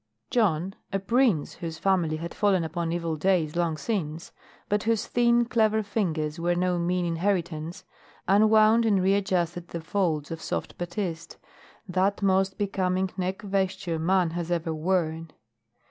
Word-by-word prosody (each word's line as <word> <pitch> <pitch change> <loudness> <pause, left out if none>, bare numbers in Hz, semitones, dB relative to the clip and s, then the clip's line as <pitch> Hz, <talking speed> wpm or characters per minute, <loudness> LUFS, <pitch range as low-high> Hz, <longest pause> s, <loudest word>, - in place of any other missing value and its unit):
Jon, 190 -6 +1 0.2
a 195 - +1
"prince" 215 - +1
whose 165 -2 -6
family 175 -3 +1
had 170 +1 -6
fallen 195 -4 +2
upon 165 +1 -3
evil 170 -1 -2
days 165 -2 +1
long 170 -2 0
since, 165 -6 -3 0.4
but 205 0 +1
whose 225 0 0
thin, 240 0 +3
clever 220 -2 +2
fingers 165 -7 -2
were 175 +1 +1
no 180 0 +1
mean 180 +1 0
inheritance, 170 -2 -2 0.4
unwound 215 +3 +5
and 210 -4 +3
readjusted 185 -3 0
the 170 - -5
folds 160 -3 -1
of 165 -1 -5
soft - - -4
batiste, 175 -1 -4 0.5
that 195 +2 0
most 190 0 +2
becoming 190 -2 0
neck 190 +2 -3
vesture 190 -3 -1
man 180 0 +2
has 170 0 -4
ever 165 -2 -1
worn. 165 -1 -1
180 Hz, 145 wpm, -26 LUFS, 165-200 Hz, 0.5 s, unwound